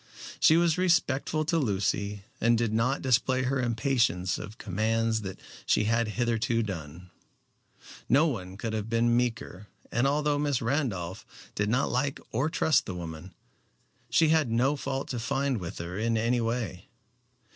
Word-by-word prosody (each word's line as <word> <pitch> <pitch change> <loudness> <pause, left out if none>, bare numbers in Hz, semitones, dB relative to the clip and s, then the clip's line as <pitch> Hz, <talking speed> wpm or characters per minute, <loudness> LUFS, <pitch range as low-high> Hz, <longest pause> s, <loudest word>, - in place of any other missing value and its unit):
She 160 - +6
was 170 0 +2
respectful 155 -3 +1
to 165 +2 +1
Lucy, 100 -3 -1 0.2
and 115 +1 +4
did 115 -2 0
not 120 +5 +1
display 130 0 +2
her 130 +1 0
impatience 115 -6 +1
of 105 +2 -8
commands 110 +3 0
that 95 -2 -7 0.3
she - - +3
had 115 +2 +1
hitherto 115 -1 +1
done. 90 -2 -7 1.0
No 140 +5 +5
one 95 - -3
could 110 +1 -4
have 110 0 -3
been 120 0 +2
meeker, 120 -5 -2 0.2
and 120 +4 +2
although 145 +1 +1
Miss 145 -3 +1
Randolph 115 - -2 0.3
did 105 0 -1
not 125 +4 +1
like 145 -2 -1
or 130 +7 0
trust 160 -3 +2
the 95 - -4
woman, 85 +1 -8 0.7
she 160 -2 +4
had 155 -5 +3
no 125 +6 +2
fault 135 -1 -3
to 125 - -3
find 135 +1 -1
with 85 -3 -6
her 85 +3 -5
in 115 +1 +1
any 120 +2 +1
way. 115 -5 -3
115 Hz, 155 wpm, -28 LUFS, 105-135 Hz, 1.0 s, She